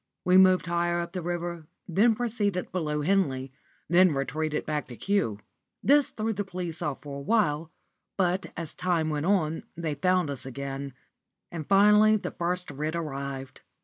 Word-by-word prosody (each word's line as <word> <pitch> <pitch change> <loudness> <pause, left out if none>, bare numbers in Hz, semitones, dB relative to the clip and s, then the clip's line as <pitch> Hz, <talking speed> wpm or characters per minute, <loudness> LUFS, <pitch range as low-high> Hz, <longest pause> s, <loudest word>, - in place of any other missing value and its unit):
We 180 - +4
moved 185 -1 +6
higher 175 0 0
up 170 0 -4
the 185 -1 -4
river, 170 -2 -4 0.2
then 215 +6 +3
proceeded 210 -6 -1
above 150 -4 -1
Henley, 135 -9 +1 0.4
then 175 -1 +5
retreated 150 +3 -2
back 150 -2 -2
again 120 -2 -11
to - - -10
Kew. 190 - +1 0.4
This 285 -1 +4
threw 220 +1 -2
the 205 0 -2
police 180 -4 -5
out 145 -2 -3
for 140 -1 -6
awhile, 160 -3 +1 0.5
but 185 0 +1
as 165 -3 -2
time 175 -3 0
went 150 +2 -1
on 165 -5 +1 0.2
they 165 -3 -2
found 180 +1 +1
us 135 -2 -5
again, 135 +1 -5 0.6
and 160 -4 -6
finally 210 +2 +6
the - - -5
first 180 0 -2
writ 155 +3 -3
arrived. 140 -4 -5
170 Hz, 165 wpm, -27 LUFS, 150-185 Hz, 0.6 s, moved